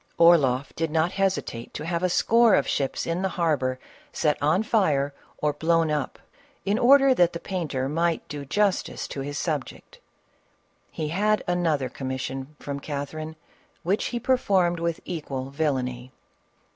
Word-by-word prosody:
Orloff 145 -6 +4
did 165 0 -1
not 160 +3 +1
hesitate 190 -12 -2
to 150 - -5
have 170 0 -1
a 185 - +1
score 230 +4 +4
of 140 - +1
ships 135 -2 -1
in 170 +2 -1
the 190 - 0
harbor 150 -8 0 0.3
set 150 -1 +1
on 155 +8 +2
fire 150 -11 +1 0.2
or 150 -1 0
blown 165 +1 +2
up, 150 -3 -2 0.5
in 205 +3 +1
order 270 +2 +6
that 175 -8 +3
the 170 - -4
paiqter 155 -9 -3
might 165 +3 0
do 145 -1 -6
justice 195 +7 0
to - - -5
his 145 +2 -4
subject. 150 -6 -4 0.9
He 155 -2 -4
had 210 +5 +1
another 165 -6 +1
commission 130 +2 -5
from 140 -1 -5
Catherine 155 +2 -5 0.5
which 190 +5 0
he 240 - -2
performed 195 -9 +2
with 170 -1 -2
equal 135 -6 -5
vil 150 +1 +1
lainy. 125 -1 -4
160 Hz, 155 wpm, -25 LUFS, 140-180 Hz, 0.9 s, order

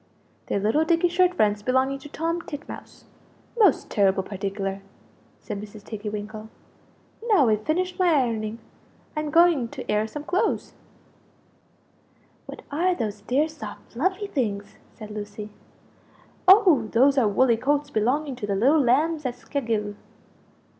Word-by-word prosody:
"They're - - 0
little 220 +10 +2
dicky 335 +2 +2
shirt 360 +1 +2
fronts 205 -7 +2
belonging 260 +4 +1
to 290 - -11
Tom 330 +3 -2
Titmouse 295 -1 -10 0.5
most 415 - +3
terrible 195 -2 +2
particular!" 195 0 -4 0.6
said 205 -3 -6
Mrs. 210 0 -11
Tiggy 210 -1 -6
winkle. 215 +1 -7 0.8
"Now 375 - +4
I've 215 0 0
finished 360 +4 -1
my 365 - +3
ironing; 230 -6 0 0.6
I'm 305 0 -2
going 330 -5 +4
to - - -6
air 210 +1 +1
some 295 +6 -7
clothes." 360 +4 -1 1.7
"What - - -9
are 355 +5 +1
these 210 -7 -4
dear 265 +9 +1
soft 280 -10 -10
fluffy 375 - -1
things?" 215 - -3 0.2
said 215 -1 -10
Lucie. 210 0 -7 1.0
"Oh 370 - +6
those 270 +4 +4
are 230 - +3
woolly 230 +3 +3
coats 285 +4 0
belonging 265 +6 0
to 210 - -5
the 200 - 0
little 275 +10 +4
lambs 300 +6 +2
at 245 - -4
Skelghyl." 230 -5 -3
250 Hz, 140 wpm, -25 LUFS, 210-310 Hz, 1.7 s, Oh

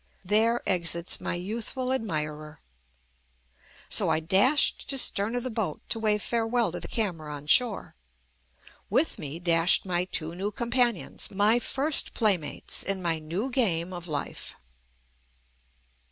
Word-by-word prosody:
There 220 +5 +2
exits 170 -2 0
my - - -2
youthful 230 +7 -3
admirer. 155 - -4 1.3
So - - +2
I - - +2
dashed 200 - +2
to 275 - -1
stern 220 -2 0
of 245 - -2
the 255 - -4
boat 215 -9 -3
to 225 - 0
wave 210 -2 +1
farewell 235 0 0
to - - -5
the - - -5
camera 170 -9 -3
on 145 0 -8
shore. 230 +7 +3 1.0
With - - 0
me 145 +2 -6
dashed 170 +1 +3
my 180 -1 0
two 165 -3 -2
new 190 +4 -3
companions, 235 -1 -1
my 205 +4 +3
first 275 +5 +2
playmates 195 -9 0
in 195 -2 -1
my 165 -2 +1
new 175 +12 -4
game 185 -8 0
of 175 0 -6
life. 150 -3 -5
195 Hz, 140 wpm, -27 LUFS, 165-235 Hz, 1.3 s, shore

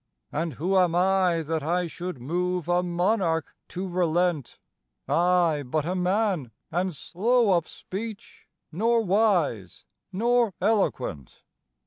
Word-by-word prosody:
"And 160 +1 -2
who 180 +8 -1
am 175 -2 +2
I 180 -2 +2
that 160 +1 -2
I 175 +4 0
should 175 -2 -6
move 180 +5 -2
a 175 0 +2
monarch 175 -2 0
to 185 +2 -5
relent? 175 -4 0 0.5
I, 175 -3 +2
but 145 +4 -2
a 180 - -1
man, 185 - 0 0.2
and 180 +1 -1
slow 215 - +2
of 170 -2 0
speech, 215 +2 -8 0.2
nor 225 +7 +2
wise, 180 - +1 0.3
nor 235 +1 +1
eloquent." 175 - -1
180 Hz, 120 wpm, -26 LUFS, 165-195 Hz, 0.5 s, am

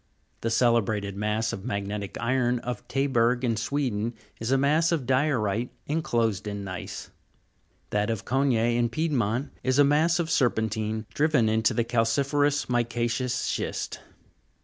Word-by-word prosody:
The 115 - -1
celebrated 110 -4 +1
mass 105 +2 -1
of 95 - -6
magnetic 100 0 -4
iron 125 0 +1
of 125 -1 -5
Taberg, 125 -2 +1
in 115 -2 +1
Sweden, 115 -1 -1 0.2
is 115 +3 -2
a 135 - +4
mass 155 +5 +3
of 155 -7 0
diorite 125 -4 +1 0.2
enclosed 115 - 0
in 100 -1 -4
gneiss; 95 -3 -7 0.8
that 105 +1 +1
of 115 -3 -3
Cogne, 135 +1 +2 0.2
in 120 -1 +2
Piedmont, 130 -4 -1
is 130 0 +1
a 145 - +7
mass 155 +4 +3
of 170 -2 -1
serpentine 110 -3 0
driven 150 -6 +3
into 110 0 +2
the 120 - +2
calci'ferous 140 +5 +1
mica'ceous 120 +1 0
schist. - - -3
120 Hz, 140 wpm, -26 LUFS, 110-135 Hz, 0.8 s, a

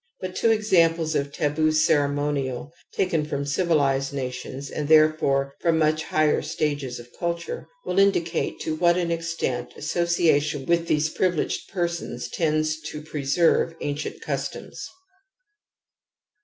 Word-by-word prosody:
But 185 -1 -6
two 230 - +2
examples 170 -7 +3
of 140 -1 -1
taboo 155 +1 +1
ceremonial 145 -2 +1 0.2
taken 170 -5 0
from 140 -1 -3
civilized 140 -3 +1
nations, 130 +1 -5
and 150 - -3
therefore 155 -3 +4
from 165 -1 +2
much 155 0 +1
higher 155 -1 +2
stages 145 -3 -2
of 120 0 -14
culture, 170 - -3 0.2
will 185 - +1
indicate 175 -4 +1
to 155 - -2
what 175 +2 +3
an 175 -2 0
extent 165 -7 -2
association 155 -3 +1
with 170 0 +1
these 155 +1 +2
privileged 180 -4 -1
persons 170 -9 -3
tends 155 -1 0
to 150 0 -7
preserve 155 +3 +1
ancient 145 0 -4
customs. - - -5
155 Hz, 125 wpm, -24 LUFS, 145-170 Hz, 0.2 s, therefore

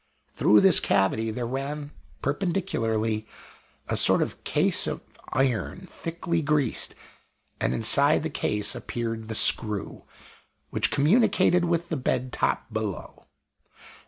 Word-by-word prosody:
Through 105 - +4
this 190 -3 +7
cavity 110 +3 +1
there 120 +2 -3
ran 140 +4 -4 0.3
perpendicularly 115 - -1 0.6
a - - -1
sort - - +5
of - - -7
case - - +2
of - - -4 0.3
iron 130 - -1
thickly 170 -1 -3
greased; 145 -5 0 0.6
and - - 0
inside 140 +7 +3
the 160 - -2
case 105 -7 -1
appeared 115 -2 -5
the 110 - -4
screw, 105 -2 0 0.7
which - - +1
communicated 185 - +3
with 170 0 -1
the 160 - -2
bed 125 -1 -2
top 115 - -1
below. 110 -4 -5
135 Hz, 120 wpm, -26 LUFS, 110-165 Hz, 0.7 s, this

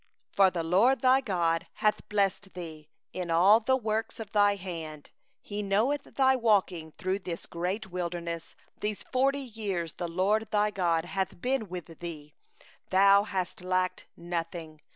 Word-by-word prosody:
7For 195 -1 +6
the 170 -2 -2
LORD 205 - +3
thy 260 0 +5
God 170 -7 0
hath 215 -1 0
blessed 200 -1 0
thee 160 -4 -8 0.2
in 180 -2 -4
all 185 +7 +6
the 260 +3 +2
work 220 -2 -2
of 220 -3 -8
thy 205 -2 +4
hand; 165 -6 -7 0.3
He 205 - -7
hath 210 - -2
known 220 +9 +2 0.2
thy 265 -1 +4
walking 190 -9 +1
through 185 +1 -2
this 175 -3 -6
great 185 +4 -3
wilderness; 170 -2 -4 0.2
these 210 -1 -3
forty 275 +2 +1
years 205 -9 -4
the 175 - -4
LORD 200 +6 +1
thy 210 0 +2
God 170 -4 +1
hath 190 0 -3
been 250 -2 -1
with 175 -3 -8
thee; 155 -4 -8 0.6
thou 200 +1 +6
hast 185 -3 -3
lacked 185 0 -1
nothing. 165 -2 -5
190 Hz, 155 wpm, -29 LUFS, 170-215 Hz, 0.6 s, 7For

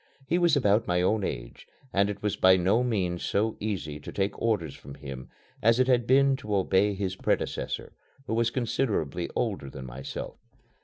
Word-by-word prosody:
He 175 +5 +1
was 170 -3 +4
about 105 -5 +3
my 90 0 +2
own 105 +2 +2
age - - -5 0.3
and 100 +1 +3
it 100 0 -6
was 105 -2 0
by 95 0 +6
no 95 +6 +3
means 95 -8 -1
so 110 +2 0
easy 90 -8 -3
to - - -8
take 100 0 -2
orders 100 -11 0
from 70 - -11
him 65 -3 -8 0.3
as 115 +2 +4
it 130 - +5
had 125 -2 +2
been 135 +1 +5
to 105 -6 -3
obey 100 +1 +2
his 95 -1 -2
predecessor, - - -2 0.3
who - - -3
was 115 0 +2
considerably 110 - -1
older 100 - -2
than 65 -1 -8
myself. 65 +2 -7
100 Hz, 185 wpm, -28 LUFS, 90-115 Hz, 0.3 s, by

